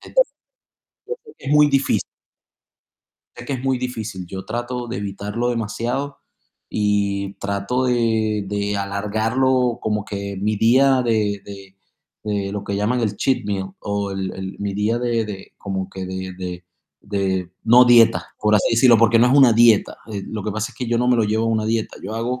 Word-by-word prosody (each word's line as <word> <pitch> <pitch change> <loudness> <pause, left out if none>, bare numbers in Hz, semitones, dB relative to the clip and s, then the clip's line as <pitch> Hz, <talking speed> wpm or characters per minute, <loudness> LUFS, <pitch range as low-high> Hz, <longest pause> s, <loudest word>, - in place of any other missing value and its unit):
Entonces - - +1 0.8
yo - - -59
creo 440 -2 -16
que - - -11
muy 150 0 +6
difícil. 140 -1 +1 1.3
Es 120 - -9
que 140 - -2
es 130 - -5
muy 130 -1 +1
difícil. 110 -7 -5
Yo 95 +2 -7
trato 120 +2 -4
de 115 - -4
evitarlo 105 +4 -3
demasiado 120 +5 -3 0.5
y 100 -1 0
trato 100 +6 -2
de 110 -4 +1
de 100 0 -1
alargarlo, 110 +6 0
como 105 -1 -1
que 100 -1 -5
mi 105 +1 0
día 130 +4 +4
de 105 -4 0
de 100 -1 -11 0.5
de 100 -2 -2
lo 105 -1 -4
que 100 - -3
llaman 115 +5 0
el 105 -3 -1
cheat 130 -1 0
meal, 95 -2 -3
o 100 -1 -2
el 95 -1 -3
el 95 0 -6
mi 100 -1 -3
día 105 +4 0
de 120 -2 0
de 100 -3 -8
como 95 -2 -4
que 95 -1 -6
de 95 0 -5
de 90 -1 -6 0.4
de, 95 -3 -2
no 120 +2 +7
dieta, 120 -2 +4
por 105 0 +2
así 105 - +3
decirlo, 115 0 +6
porque 115 +1 +4
no 120 - +5
es 125 - +3
una 130 -5 +7
dieta, 115 -2 +4 0.2
eh, 100 -1 -4
lo 110 -2 -5
que 105 - -2
pasa 110 +1 -3
es - - -21
que 125 - -3
yo 120 0 +1
no 125 +1 +1
me 125 - +4
lo 115 - +2
llevo 110 +2 0
a - - 0
una 110 -1 0
dieta, 110 0 -1
yo 105 +3 -5
hago 120 +3 -2
110 Hz, 195 wpm, -21 LUFS, 100-120 Hz, 1.3 s, no